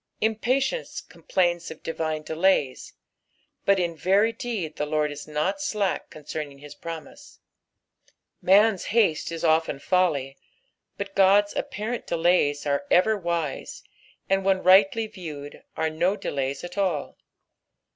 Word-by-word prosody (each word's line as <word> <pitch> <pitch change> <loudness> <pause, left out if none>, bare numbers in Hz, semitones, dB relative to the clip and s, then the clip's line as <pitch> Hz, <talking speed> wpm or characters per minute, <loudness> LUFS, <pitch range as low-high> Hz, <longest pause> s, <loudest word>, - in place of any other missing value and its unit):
Impatience 255 - 0
complains 175 -2 -1
of 155 - -11
divine 155 -1 -3
delays, 160 -5 0 0.7
but 200 -1 +4
in 170 -2 -1
very 195 +7 +3
deed 220 -10 -4
the 150 - -1
Lord 150 0 0
is 145 +1 -8
not 155 - -1
slack 210 -9 -1
concerning 150 -1 -7
his 145 +1 -11
promise. 265 - -9 1.0
Han's 200 +1 +4
haste 205 -9 +1
is 165 0 -5
often 160 -2 +2
folly, 140 -5 0 0.6
but 200 0 -5
God's 200 +1 +4
apparent 220 +4 -4
_delays 165 -4 +2
are 140 +3 0
ever 215 +5 +4
wise; 170 -7 -3 0.4
and, 195 0 +1
when 190 -1 +2
rightly 195 +4 +5
viewed, 155 -9 -9 0.2
are 160 0 0
no 175 +5 +1
delays 140 -7 -3
at 175 +3 -6
all. 175 -7 -1
175 Hz, 125 wpm, -25 LUFS, 155-200 Hz, 1.0 s, rightly